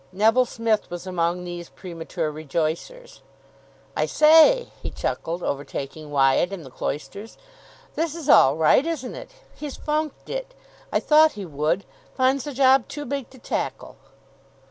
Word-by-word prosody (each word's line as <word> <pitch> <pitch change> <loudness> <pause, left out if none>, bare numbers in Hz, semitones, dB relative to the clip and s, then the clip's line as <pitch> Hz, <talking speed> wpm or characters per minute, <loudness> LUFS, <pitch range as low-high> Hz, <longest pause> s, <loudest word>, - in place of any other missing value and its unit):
Neville 225 +6 +3
Smith 225 -2 -1
was 175 +1 -7
among 180 -1 -1
these 175 -1 -7
premature 165 -2 -5
rejoicers. 160 - -4 0.7
"I - - 0
say," 325 +11 +6
he - - -4
chuckled, 170 +2 -3
overtaking 140 +2 -5
Wyatt 140 +5 +3
in 190 -4 -6
the 130 - -12
cloisters, 200 - -6 0.6
"this 325 -1 -2
is 325 -4 -7
all 135 - +6
right, 160 - +4
isn't 305 -6 -4
it! - - -9 0.2
He's 295 -2 -7
funked 305 -1 -3
it. - - -5 0.4
I - - +2
thought 310 0 +5
he 205 -2 -7
would. 155 +4 -1 0.3
Finds 260 0 +2
the 290 - -5
job 265 -2 +4
too 295 -1 -6
big 280 -3 -4
to 260 - -16
tackle." - - -4
210 Hz, 145 wpm, -24 LUFS, -, 0.7 s, say